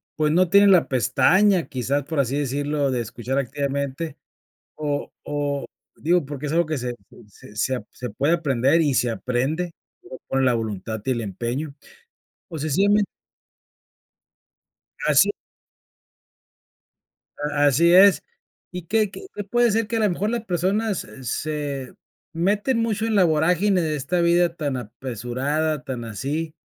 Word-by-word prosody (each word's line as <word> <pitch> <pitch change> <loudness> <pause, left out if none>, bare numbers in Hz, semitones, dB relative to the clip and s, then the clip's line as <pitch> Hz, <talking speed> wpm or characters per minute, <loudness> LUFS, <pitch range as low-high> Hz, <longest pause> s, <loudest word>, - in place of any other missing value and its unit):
pues, 150 -1 +1
no 180 0 +3
tienen 200 +1 +6
la 180 -3 +5
pestaña, 180 - +3
quizá, 135 +3 -1
por 160 -1 -3
así 135 +1 +1
decirlo, 145 0 -1
de 125 - -1
escuchar 120 +4 -4
activamente. 140 +3 -3 0.6
O 145 -2 -3
o 145 -1 -2 0.3
digo, 170 0 +1
porque 145 +1 -5
es - - -3
algo 170 +1 +3
que 155 - -2
se 125 0 -4 0.3
se 105 0 -16
se 130 +5 0
ap 125 - -7
se 125 -1 -6
puede 145 +9 +1
aprender, 145 -1 +2
y 145 -4 +2
se 125 - +2
aprende 135 +9 -2 0.6
con 135 0 +1
la 125 - +4
voluntad 110 -1 -4
y 130 - +1
el 120 - -1
empeño. 120 +8 -4 0.7
O 160 -3 -6
sencillamente. 200 +8 +2 2.0
Así - - +5 2.2
A 145 - +3
así 170 +5 +4
es. 195 +1 +7 0.5
Y 180 -1 -6
que 210 +3 +1
que 190 - -10
que 205 - -4
puede 240 +3 +2
ser 220 0 +1
que 230 - -1
a - - 0
lo 210 -2 +3
mejor 200 +4 -1
las 235 -1 -2
personas, 195 +3 0
eh, 135 - -13
se 140 0 -3 0.4
meten 205 +8 +1
mucho 220 -1 -1
en 225 - 0
la 195 - +5
vorágine 175 +4 +2
de 155 -2 -1
esta 150 +6 -1
vida 170 0 +3
tan 145 -5 -2
apresurada, 130 +6 -3
tan 130 -5 -5
así, 150 +9 -4
150 Hz, 150 wpm, -23 LUFS, 130-180 Hz, 2.2 s, es